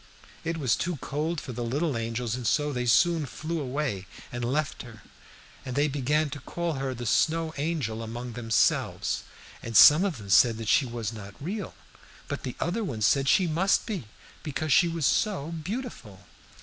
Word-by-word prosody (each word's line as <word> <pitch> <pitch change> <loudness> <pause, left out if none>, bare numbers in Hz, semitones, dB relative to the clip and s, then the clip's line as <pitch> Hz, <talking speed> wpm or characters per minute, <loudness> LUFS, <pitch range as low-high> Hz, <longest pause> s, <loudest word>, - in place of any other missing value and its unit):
"It 165 0 -2
was 130 -8 +2
too 175 0 -2
cold 150 +5 -2
for 130 - -7
the 120 +1 -4
little 140 +5 -1
angels, 115 0 -2
and 125 -2 -3
so 150 -1 +1
they 125 -1 -2
soon 165 +5 +3
flew 160 +4 -4
away 130 -8 -3 0.2
and 120 0 -4
left 140 +5 -1
her; 115 -4 -12 0.6
and 125 - -5
they 145 +1 +3
began 145 +2 0
to 145 - -5
call 170 +4 -3
her 135 -2 -3
the 120 0 -6
Snow 160 +7 +1
Angel 140 -7 -2
among 120 +2 -6
themselves, 115 -1 +1 0.4
and 115 -1 0
some 150 +5 +9
of 190 -8 -1
them 100 -3 -8
said 115 +1 +4
she 135 +4 +4
was 115 -2 -4
not 100 -2 -9
real, 195 +7 -5 0.5
but - - -4
the 125 - -5
other 190 +7 -1
ones 110 - -1
said 135 +2 +3
she 185 - +4
must 175 +4 +2
be, 195 - -4 0.4
because 150 0 -1
she 175 - +5
was 165 -3 -1
so 190 - +1
beautiful. 165 - -6
140 Hz, 180 wpm, -27 LUFS, 120-165 Hz, 0.6 s, some